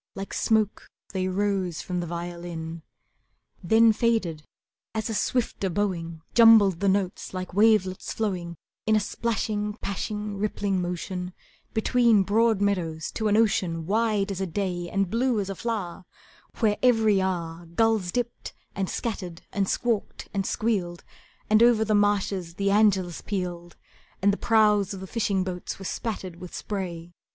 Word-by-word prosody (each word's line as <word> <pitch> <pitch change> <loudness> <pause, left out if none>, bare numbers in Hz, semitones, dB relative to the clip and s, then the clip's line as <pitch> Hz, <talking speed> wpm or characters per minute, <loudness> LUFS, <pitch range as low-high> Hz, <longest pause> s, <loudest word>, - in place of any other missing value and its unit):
Like 195 0 -6
smoke 215 -2 +1 0.3
they 185 -1 -1
rose 190 -3 -1
from 180 -1 -3
the 175 - -3
violin 170 -1 -6 0.8
Then 225 +4 +5
faded 210 -9 0 0.5
as 220 +1 -2
a - - -2
swifter 220 -3 0
bowing 170 -4 -2
Jumbled 220 -6 +7
the 200 - +2
notes 190 -1 -1
like 185 -1 -5
wavelets 205 -2 +3
flowing 180 -6 -2 0.3
In 220 - +4
a - - +4
splashing, 210 -1 -2
pashing, 210 0 -4
rippling 200 -2 -1
motion 180 +1 -4 0.4
Between 225 -2 +4
broad 220 +1 +2
meadows 170 -6 -1
to 220 - -1
an 210 0 +3
ocean 185 -7 +1
Wide 210 0 +1
as 195 -1 -4
a 190 - -1
day 175 -1 -3
and 195 -1 0
blue 240 0 +1
as 195 -1 -2
a - - -5
flower, 195 -5 -4 0.6
Where 210 -2 +3
every 225 -5 +4
hour 170 -2 -3
Gulls 210 +1 +1
dipped, 240 +2 -4 0.2
and 195 -2 -2
scattered, 180 -7 -4
and 195 -1 0
squawked, 230 -4 -1
and 195 -1 -1
squealed, 185 -6 -1 0.4
And 215 +1 +4
over 235 -2 +5
the 215 - +1
marshes 200 -4 +1
the 200 +1 +1
Angelus 195 -4 +2
pealed, 175 -3 -4 0.4
And 200 +1 +3
the - - -2
prows 210 -3 +3
of - - -8
the 190 - -7
fishing 200 -2 0
boats 180 -1 -5
were 195 - -9
spattered 190 -5 -4
With 180 0 -9
spray. 175 -4 -5
195 Hz, 150 wpm, -26 LUFS, 180-215 Hz, 0.8 s, Jumbled